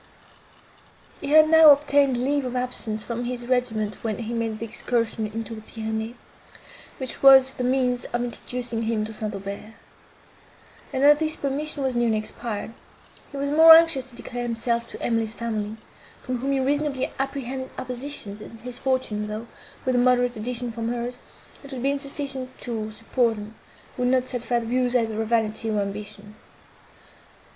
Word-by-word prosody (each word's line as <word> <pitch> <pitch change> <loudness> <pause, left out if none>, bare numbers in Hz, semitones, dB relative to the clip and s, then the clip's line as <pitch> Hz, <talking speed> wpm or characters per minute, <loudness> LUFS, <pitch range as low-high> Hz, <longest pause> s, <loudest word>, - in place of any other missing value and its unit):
He - - -4
had 310 +1 +7
now 320 -1 +8
obtained 285 -2 +4
leave 280 +3 +1
of 250 -1 -4
absence 245 -4 -1
from 240 0 -4
his 245 0 -4
regiment 230 -4 -1
when 220 -3 -2
he 230 0 -5
made 225 -2 -2
the 230 - -5
excursion 230 -1 -1
into 225 +2 -6
the 220 - -8
Pyrenees, 220 +1 -4 0.8
which 260 -2 -4
was 265 -1 +8
the 250 - -4
means 250 -1 +1
of 240 0 -2
introducing 240 -1 -4
him 220 -1 0
to 220 - -7
St. 215 -1 -3
Aubert; 200 +3 -7 1.2
and, 265 -1 -1
as 295 +1 +7
this 310 0 0
permission 285 +1 -2
was 260 -2 -1
nearly 235 -2 +2
expired, 215 0 -5 0.6
he 280 - -7
was 280 +1 -1
the - - 0
more 320 +1 +11
anxious 325 -6 +4
to 260 -2 -15
declare 245 0 -6
himself 235 0 -1
to - - -9
Emily's 225 -1 0
family, 220 -2 -3 0.5
from 255 -1 -3
whom 270 +3 -1
he 270 - +1
reasonably 280 0 0
apprehended 265 -1 -3
opposition, 250 -4 -5
since 220 +1 -11
his 250 -1 -3
fortune, 255 -6 -1
though, 215 +2 -5 0.4
with 260 - +1
a - - +4
moderate 245 0 +3
addition 240 +2 -3
from 230 0 -4
hers, 245 +1 -3 0.4
it 280 - -9
would 255 -2 -5
be 280 +1 +2
sufficient 275 -2 -6
to 220 -3 -4
support 225 +2 0
them, 210 +1 -8 0.4
would 250 -1 +1
not 255 0 +2
satisfy 245 -1 -1
the - - -6
views, 250 +1 +1
either 225 -2 +1
of 220 - -2
vanity, 225 -1 0
or 210 -1 0
ambition. 205 +1 -5
245 Hz, 170 wpm, -24 LUFS, 225-265 Hz, 1.2 s, more